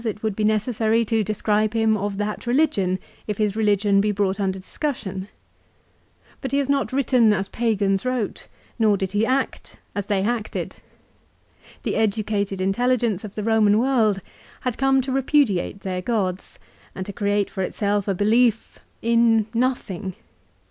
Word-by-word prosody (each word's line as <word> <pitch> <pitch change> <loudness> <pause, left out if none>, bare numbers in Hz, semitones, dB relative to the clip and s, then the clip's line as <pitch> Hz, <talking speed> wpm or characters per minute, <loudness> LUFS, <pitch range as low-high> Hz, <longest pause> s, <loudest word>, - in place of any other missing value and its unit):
it 215 -2 -4
would 215 -3 -1
be 215 - -1
necessary 220 +1 +1
to 220 0 +1
describe 215 +1 0
him 220 -1 +3
of 205 -1 -3
that 210 +2 -3
religion, 240 -9 +2 0.3
if 210 -2 -2
his 210 -2 0
religion 205 -2 +3
be 210 +1 +1
brought 200 -1 0
under 190 -1 0
discussion. 195 -3 -4 1.1
But 265 - -4
he 280 - +1
has 280 -2 +1
not 280 -1 +1
written 255 -4 +3
as 195 0 -2
pagans 200 -4 0
wrote, 255 -4 -2 0.3
nor 215 -3 +4
did 190 -1 -3
he 210 +3 +1
act 265 +2 -2 0.2
as 200 -1 -3
they 200 -2 +1
acted. 225 0 -3 1.1
The - - -1
educated 205 -2 0
intelligence 225 +1 +1
of 210 -2 -8
the 210 - -3
Eoman 215 -2 +4
world 220 -5 +2 0.4
had 250 -3 -2
come 270 0 +3
to 260 +1 -4
repudiate 260 -8 +1
their 185 -1 -3
gods, 190 -4 -2 0.4
and 185 - -4
to 200 - -7
create 205 -2 0
for 190 - -4
itself 205 +1 -1
a 195 - +1
belief, 225 +3 +2 0.2
in 230 -1 +4
nothing. 215 -7 -1
215 Hz, 155 wpm, -23 LUFS, 200-235 Hz, 1.1 s, nor